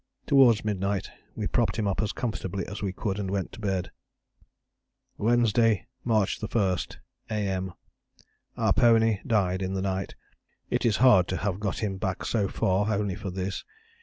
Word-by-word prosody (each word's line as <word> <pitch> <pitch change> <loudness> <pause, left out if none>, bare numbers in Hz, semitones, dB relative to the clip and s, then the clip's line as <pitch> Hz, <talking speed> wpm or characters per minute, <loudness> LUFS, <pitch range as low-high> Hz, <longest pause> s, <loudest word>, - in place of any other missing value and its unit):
Towards 125 -6 +5
midnight 100 -1 -1 0.2
we - - -3
propped - - +1
him 105 -2 0
up 100 - 0
as 110 0 -1
comfortably 100 -5 -3
as 100 - -7
we 100 -2 -1
could 95 +1 -3
and 95 -2 -3
went 95 -1 -2
to - - -11
bed. 95 -4 -2 1.3
"Wednesday, 115 -2 +3 0.2
March 110 -4 +1
1. 100 -4 +1 0.5
A.M. 95 -4 -2 0.8
Our - - +3
pony 115 -3 +4
died 95 -4 +1
in 95 0 -2
the 95 - -1
night. 95 -1 -2 0.6
It - - +1
is 110 - +2
hard 95 -8 +6
to 95 - -2
have 100 -1 -2
got 105 0 -2
him 95 -3 -1
back 95 0 -3
so 105 -4 +1
far 95 +3 +1
only 100 -2 0
for 100 +1 -5
this. 95 +1 -4
100 Hz, 165 wpm, -27 LUFS, 95-110 Hz, 1.3 s, hard